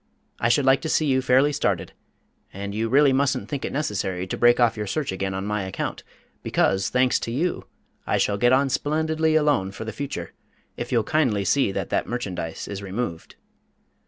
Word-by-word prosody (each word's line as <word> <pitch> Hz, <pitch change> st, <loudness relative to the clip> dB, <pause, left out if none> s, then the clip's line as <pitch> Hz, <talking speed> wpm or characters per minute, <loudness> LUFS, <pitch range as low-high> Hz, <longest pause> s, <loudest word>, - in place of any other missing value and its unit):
I 115 Hz, -, +2 dB
should 135 Hz, +3 st, +3 dB
like 135 Hz, 0 st, +4 dB
to 160 Hz, -, -3 dB
see 155 Hz, -, +2 dB
you 130 Hz, -2 st, +2 dB
fairly 130 Hz, +3 st, +3 dB
started, 145 Hz, -, -1 dB, 0.6 s
and 100 Hz, +1 st, -6 dB
you 110 Hz, +2 st, -1 dB
really 140 Hz, +2 st, +5 dB
mustn't 135 Hz, -6 st, +1 dB
think 140 Hz, 0 st, -4 dB
it -, -, -3 dB
necessary 95 Hz, -10 st, -2 dB
to 95 Hz, -, -4 dB
break 120 Hz, +1 st, +4 dB
off 120 Hz, -2 st, +3 dB
your 105 Hz, -1 st, -4 dB
search 145 Hz, +4 st, -2 dB
again 95 Hz, 0 st, -3 dB
on 95 Hz, +1 st, -3 dB
my 105 Hz, 0 st, -1 dB
account, 95 Hz, 0 st, -4 dB, 0.4 s
because, 95 Hz, 0 st, +1 dB
thanks 125 Hz, 0 st, +2 dB
to 115 Hz, -, -4 dB
you, 165 Hz, +9 st, -1 dB, 0.4 s
I -, -, +2 dB
shall 100 Hz, -1 st, 0 dB
get 120 Hz, +2 st, +4 dB
on 135 Hz, +1 st, +3 dB
splendidly 155 Hz, +3 st, 0 dB
alone 145 Hz, -11 st, +2 dB
for 110 Hz, +3 st, -7 dB
the 110 Hz, -, -5 dB
future 135 Hz, -10 st, -5 dB, 0.4 s
if 120 Hz, -, -6 dB
you'll 115 Hz, -3 st, +2 dB
kindly 115 Hz, -8 st, +1 dB
see 135 Hz, -5 st, +2 dB
that -, -, -4 dB
that -, -, 0 dB
merchandise 95 Hz, -9 st, -4 dB
is 100 Hz, -1 st, -6 dB
removed." 95 Hz, -3 st, -5 dB
120 Hz, 195 wpm, -24 LUFS, 100-140 Hz, 0.6 s, really